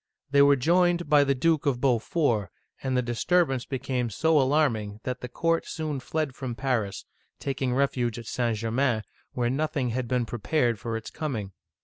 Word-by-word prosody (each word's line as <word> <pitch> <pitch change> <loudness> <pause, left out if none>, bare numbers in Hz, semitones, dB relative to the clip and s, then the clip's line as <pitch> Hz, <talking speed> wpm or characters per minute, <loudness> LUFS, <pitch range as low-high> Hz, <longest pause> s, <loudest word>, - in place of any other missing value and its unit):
They 140 0 +5
were 140 0 +6
joined 175 +5 +2
by 145 -1 +7
the 140 -1 +1
Duke 155 +2 +1
of 130 -3 +1
Beaufort, 125 - +1 0.3
and 130 -1 0
the 125 - +2
dis 120 -1 -3
turbance 165 -8 +2
became 130 -2 -2
so 155 +7 +3
alarming 125 -7 +1
that 125 -1 -4
the 125 - -6
court 165 +5 0
soon 155 -3 -3
fled 155 +1 -2
from 130 -2 -5
Paris, 115 -8 -2 0.3
taking 130 -2 -1
refuge 125 -4 0
at 120 - -8
St. 120 -1 -1
Germain, 115 +1 0 0.3
where 120 -1 0
nothing 145 -2 -1
had 120 +1 -2
been 125 0 0
prepared 120 0 0
for 115 0 -3
its 115 - -8
coming. 125 - -4
130 Hz, 180 wpm, -27 LUFS, 120-150 Hz, 0.3 s, by